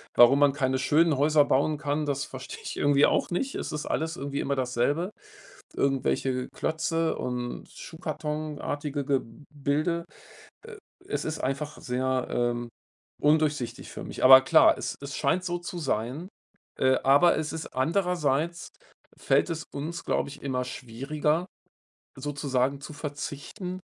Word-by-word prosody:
Warum 120 +3 +7
man 145 -1 +5
keine 130 -2 0
schönen 150 +3 +3
Häuser 150 +1 +4
bauen 150 +3 +2
kann, 150 +1 -1
das 140 -1 -1
verstehe 130 -1 -9
ich - - -5
irgendwie 145 0 +4
auch - - 0
nicht. 260 +10 -2
Es - - -4
ist 150 0 -4
alles 160 +2 -2
irgendwie 140 +1 -4
immer 140 - -1
dasselbe, 130 +7 0 0.7
irgendwelche 130 -1 0
Klötze 165 0 -1
und 125 -1 -4
schuhkartonartige 150 -2 -4
Gebilde. 145 +5 -2 0.6
Äh, 460 -1 -9 0.3
es 410 - -2
ist 155 0 -3
einfach 140 +3 -3
sehr, 130 +1 -1
ähm, 120 0 -1 0.5
undurchsichtig 150 -4 +1
für - - -7
mich. - - -7
Aber 130 0 +10
klar, - - +6
es - - -4
es 140 0 -6
scheint 185 +1 +1
so 175 -1 -2
zu 175 +1 -6
sein, 135 +3 -2 0.5
äh, 130 0 +3
aber 145 +6 +6
es 155 -1 -3
ist 160 0 -5
andererseits, 170 +1 0 0.5
fällt - - +2
es 160 -2 -3
uns, 160 +4 -5
glaube - - 0
ich, 140 - -11
immer 130 -2 -1
schwieriger 145 +7 -2 0.7
sozusagen 140 -1 -1
zu 150 - -8
verzichten, 150 +6 -6
145 Hz, 140 wpm, -27 LUFS, 130-160 Hz, 0.7 s, Aber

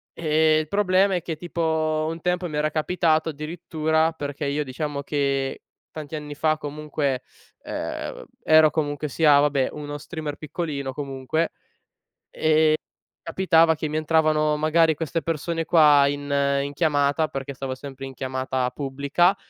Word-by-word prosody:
ehm, 155 -1 +3
il 155 - -3
problema 195 +1 +2
è 175 - -1
che 160 -1 -4
tipo 160 -2 -1
un 165 0 -6
tempo 180 0 0
mi 150 - -4
era 150 +1 +1
capitato 160 0 +1
addirittura, 160 +1 -1
perché 145 -1 -5
io 145 +2 0
diciamo 140 +1 -4
che 140 -2 -1 0.3
tanti 155 0 -7
anni 150 -1 -6
fa, 155 +1 +1
comunque, 145 -3 -3 0.4
ehm, - - -4
vab - - -11 0.2
ero 155 0 +6
comunque 145 -1 -2
sia, 145 0 +5
vabbè, 145 -2 +2
uno 145 -1 -6
streamer 150 0 -6
piccolino, 145 -3 -4
comunque, 135 +3 -2
e - - -3 1.7
e - - -76
capitava 165 -3 +4
che 155 0 -4
mi 155 - -3
entravano 155 -1 +2
magari 160 +1 +3
queste 165 +2 -2
persone 165 +1 -2
qua 150 -4 +6
in 145 0 -3 0.3
in 140 0 -4
chiamata 145 0 +1
perché 135 0 -5
stavo 130 -1 -5
sempre 135 0 -8
in 135 - -9
chiamata 130 -1 -2
pubblica 140 +8 +1
155 Hz, 150 wpm, -24 LUFS, 140-160 Hz, 1.7 s, ero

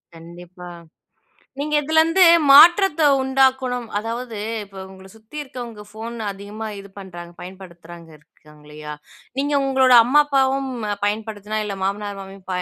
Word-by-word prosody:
கண்டிப்பா, 175 +2 -13 0.9
நீங்க 300 +1 -3
இதுலருந்து 320 +4 +3 0.3
மாற்றத்த 340 +3 +6 0.2
உண்டாக்கணும், 265 -2 0
அதாவது 230 +1 -5 0.3
இப்ப 195 -1 -16
உங்கள 190 0 -15
சுத்தி 220 +7 -14
இருக்கவங்க 240 -6 -9
ஃபோன் 225 +2 -8 0.2
அதிகமா 205 +3 -8
இது 200 0 -13
பண்றாங்க, 175 -3 -10
பயன்படுத்துறாங்க 175 -3 -12
இருக்காங்க 150 0 -22
இல்லயா? 150 0 -9 0.5
நீங்க 285 +1 -1
உங்களோட 265 -1 +3
அம்மா, 280 +5 +4
அப்பாவும் 270 -1 0 0.4
பயன்படுத்துனா, 215 0 -4
இல்ல 200 -1 -5
மாமனார், 200 +1 -3
மாமியாரும் 195 -1 -13
215 Hz, 120 wpm, -20 LUFS, 190-265 Hz, 0.9 s, மாற்றத்த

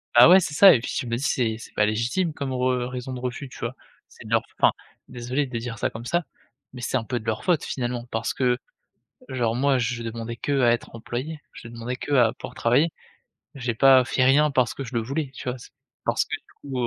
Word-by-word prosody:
Bah 125 +7 +9
ouais 185 +1 +9
c'est 155 -5 -3
ça 195 +5 +9
et 120 - +3
puis 120 - -5
je - - -2
me 115 0 -1
dis - - -6
c'est 115 -6 0
c'est - - -12
pas 105 - +3
légitime 120 - 0
comme 140 -3 -4
re 125 -1 0
raison 125 +1 -6
de 130 - -5
refus, 125 +2 -5
tu - - -12
vois? 120 +2 -4 0.3
C'est - - -15
de - - -9
leur - - +4
f - - -21
enfin - - +5 0.4
désolé 125 +3 -2
de 125 -3 -5
dire 115 -1 -6
ça - - 0
comme 115 +1 -9
ça, 170 +6 0 0.5
mais 125 - -10
c'est 125 - -2
un 120 - +1
peu 120 +2 -3
de 110 - -14
leur 110 -1 -2
faute 175 -5 +1
finalement 120 -2 -3
parce 115 +1 -2
que 125 -2 +1 0.7
genre 120 -3 0
moi 135 0 +2
je 120 0 -2
demandais 115 0 -5
que 140 +2 -1
à 120 -2 +5
être 120 - -4
employé, 130 +7 -5
je 115 - -10
demandais 120 +2 -5
que 145 - -5
à 120 -5 +4
pouvoir - - -9
travailler, 140 +8 +2 0.6
j'ai 125 -3 -3
pas 130 +1 +6
fait 130 +1 +1
rien 145 +4 +5
parce 130 -4 +1
que 135 - -5
je 125 - -9
le 115 - +2
voulais 135 +5 -3
tu 125 - -7
vois? 125 - -2
C'est - - -13 0.3
parce - - +1
que - - -3
du - - -23 0.2
coup, 135 -2 -5
heu, 120 - +1
125 Hz, 255 wpm, -24 LUFS, 115-135 Hz, 0.7 s, Bah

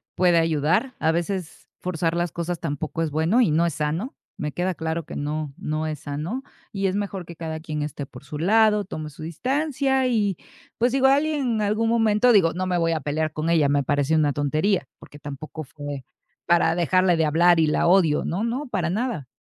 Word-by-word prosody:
puede 180 -1 +4
ayudar. 165 - +1
A 160 - +2
veces 175 +1 -3
forzar 170 -2 -1
las 175 -1 -1
cosas 170 +1 -3
tampoco 155 0 -3
es 160 -2 -1
bueno 160 - +2
y 220 - +3
no 165 +3 +3
es 170 -4 -2
sano. 155 - -2 0.2
Me 150 0 -3
queda 180 +3 -1
claro 160 0 -3
que - - -8
no, 150 0 -3
no 155 +1 -2
es 155 -2 -4
sano 155 - -4 0.3
y 195 -1 0
es 190 - -1
mejor 200 -3 -3
que 170 -1 -11
cada 160 -1 -5
quien 155 -2 -4
esté 145 -1 -5
por 140 - -14
su 150 - -6
lado, 210 +5 +4
tome 155 -5 -6
su 155 +1 -11
distancia 265 - 0
y, 210 -6 +1 0.4
pues, 240 +2 +2
digo 265 +1 +3
alguien 295 +3 +2 0.2
en 215 - 0
algún 215 +2 +1
momento 225 +1 +3
digo, 180 -6 +5
no 185 +2 -2
me 180 -1 +1
voy 165 -1 +1
a 165 - 0
pelear 155 +2 -1
con 155 +2 -2
ella, 160 -4 +3
me 140 0 +2
parece 145 +2 +1
una 150 -2 +3
tontería, 155 +2 0
porque 145 - -14
tampoco 150 +2 -7
fue 145 -1 -7 0.4
para 170 -1 +3
dejarle 180 +1 +3
de 165 - +2
hablar 165 +2 +4
y 160 - +3
la 150 - +2
odio. 170 -5 +4
No, 190 +6 -2
no, 250 +5 -2
para 185 -8 -1
nada. 215 - -2
170 Hz, 210 wpm, -24 LUFS, 155-205 Hz, 0.4 s, digo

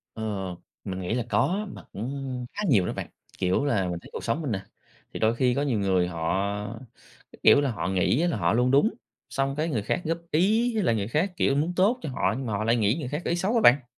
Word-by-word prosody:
Ờ, 110 - -6 0.6
mình 95 -2 -4
nghĩ 90 +4 -2
là 120 -1 -1
có, 205 +4 +1
mà - - -10
cũng 130 +2 -4
khá 205 - -4
nhiều 100 - +4
đó - - -2
bạn, - - -6 0.3
kiểu 95 +8 +1
là, 105 -10 +1
mình 85 -1 -3
thấy - - -14
cuộc - - -6
sống 115 +7 0
mình 145 - -3
nè, 95 -2 -2 0.5
thì - - -4
đôi 110 +1 +3
khi 125 0 +2
có 140 - 0
nhiều 130 -7 0
người 95 -3 +2
họ, 95 +5 -2 0.5
cái - - -15
kiểu - - +7
là, 140 -2 0
họ 105 - -3
nghĩ 95 - +2
là 170 - 0
họ 85 +1 +1
luôn 125 +2 +2
đúng, 140 - +4 0.4
xong 135 0 -1
cái 155 +2 0
người 120 -10 -1
khác 105 - -1
góp 165 +1 -1
ý 215 +9 +3
với 215 - +1
lại 115 - +2
người 100 -1 -2
khác, 165 +10 0
kiểu, 135 - +2
muốn 155 +5 0
tốt 210 +7 +3
cho - - -4
họ, 105 -5 0
nhưng 130 0 -4
mà 110 - -2
họ 105 +1 -1
lại 115 +2 +3
nghĩ 110 0 +2
người 135 -6 -4
khác 150 +5 -3
có - - -1
ý 170 - +1
xấu 190 +6 0
á 230 - +4
bạn. 135 - +6
125 Hz, 265 wpm, -26 LUFS, 100-155 Hz, 0.6 s, kiểu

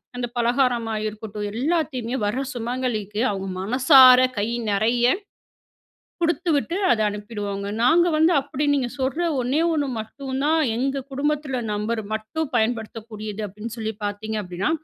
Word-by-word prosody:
அந்த 245 0 -2
பலகாரமா 240 -2 +1
இருக்கட்டும். 215 -1 -6 0.2
எல்லாத்தையுமே 275 -6 -1
வர 250 +6 -1
சுமங்கலிக்கு, 230 -3 -2
அவுங்க 195 -1 -4
மனசார 255 +3 +7 0.2
கை 205 - 0 0.2
நெறைய 230 +4 +2 1.2
குடுத்துவிட்டு, 335 -1 +1 0.2
அத 220 - +2
அனுப்பிடுவோங்க. 205 -1 -5 0.2
நாங்க 340 +7 +5
வந்து 320 +3 +4
அப்டி 280 +1 -3
நீங்க 255 -3 -1
சொல்ற 270 +7 0 0.2
ஒண்ணே 260 +6 +1
ஒண்ணு 290 -3 0
மட்டும் 265 +4 -5
தான், 320 +2 +3 0.2
எங்க 270 +2 -1
குடும்பத்துல 280 -2 -1
நபர் 220 +2 -2
மட்டும் 265 +8 -3
பயன்படுத்தக்கூடியது 220 -2 -3
அப்டீன்னு 210 +4 -8
சொல்லி 220 -1 -3
பார்த்தீங்க 210 +2 -4
அப்பிடீன்னா. 180 +1 -2
240 Hz, 125 wpm, -23 LUFS, 215-275 Hz, 1.2 s, மனசார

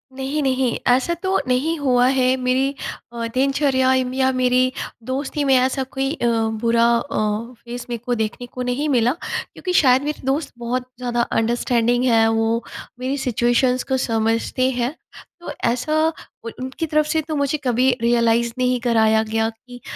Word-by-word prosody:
नहीं, 270 +3 -2
नहीं 260 -2 +1
ऐसा 255 +7 +3
तो 380 +1 +1
नहीं 280 +7 +1
हुआ 250 -3 +3
है 260 -1 +3
मेरी 255 +2 +1 0.4
अ, 230 -1 -3
दिनचर्या 265 -1 +2
य 260 0 +2
या 265 0 +2
मेरी 255 0 +2 0.3
दोस्ती 270 +3 -3
में 270 -1 +4
ऐसा 260 +1 +2
कोई 270 +1 -3
अ, 240 - -1 0.3
बुरा 230 0 +3
अ, 235 +5 -3 0.5
फ़ेस 245 +1 -7
मेरे 240 - -2
को 245 - 0
देखने 220 +2 -3
को 250 - -7
नहीं 250 +5 -1
मिला, 245 -2 +3 0.4
क्योंकि 365 -1 -4
शायद 260 -5 +5
मेरे 300 +1 -4
दोस्त 280 +3 -1
बहुत 245 +1 -3
ज़्यादा 240 -1 -1
अंडरस्टैंडिंग 240 +1 +1
हैं, 225 -2 +4
वो 225 +1 +1 0.4
मेरी 265 +3 -2
सिचुएशंस 250 0 +1
को 265 -1 -1
समझते 230 +2 0
हैं। 250 +3 -2 0.4
तो 345 - -7 0.2
ऐसा 305 +6 -1 0.5
उन 230 - -5
उनकी 260 +6 -4
तरफ 305 0 +1
से 315 +1 0
तो 310 0 -5
मुझे 285 +1 0
कभी 255 +1 +2
रियलाइज़ 235 0 +2
नहीं 250 -1 +1
कराया 220 -2 +3
गया 220 0 0
कि 245 +2 -14
255 Hz, 165 wpm, -21 LUFS, 235-270 Hz, 0.5 s, शायद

